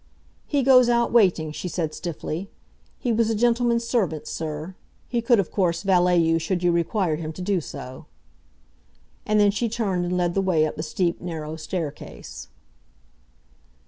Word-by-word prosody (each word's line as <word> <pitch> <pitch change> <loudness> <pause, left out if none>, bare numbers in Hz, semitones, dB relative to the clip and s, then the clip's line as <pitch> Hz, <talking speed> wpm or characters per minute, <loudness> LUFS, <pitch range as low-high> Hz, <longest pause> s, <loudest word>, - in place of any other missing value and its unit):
"He 285 -2 +1
goes 255 -2 +6
out 235 0 +2
waiting," 180 -9 +3
she 165 - -5
said 165 -3 -2
stiffly. 170 +3 -5 0.5
"He 245 - -1
was 225 0 +2
a 225 - +1
gentleman's 235 +1 +2
servant, 180 - 0
sir. 155 +2 -5 0.3
He 240 -1 -1
could, 230 -1 +4
of 190 - -1
course, 170 -4 0
valet 180 -2 +3
you 165 -1 +3
should 175 +2 -2
you 175 - +4
require 170 -1 0
him 160 -1 -5
to 185 - -8
do 190 -2 0
so." 130 -3 -9 1.2
And 215 0 +3
then 205 -1 +5
she 225 +3 -1
turned 195 -6 -1
and 180 +1 -1
led 175 -1 +1
the 195 - +1
way 175 -5 +2
up 155 - -4
the - - -4
steep, 170 +2 -1
narrow 160 -3 -5
staircase. 160 -2 -6
180 Hz, 170 wpm, -24 LUFS, 165-220 Hz, 1.2 s, goes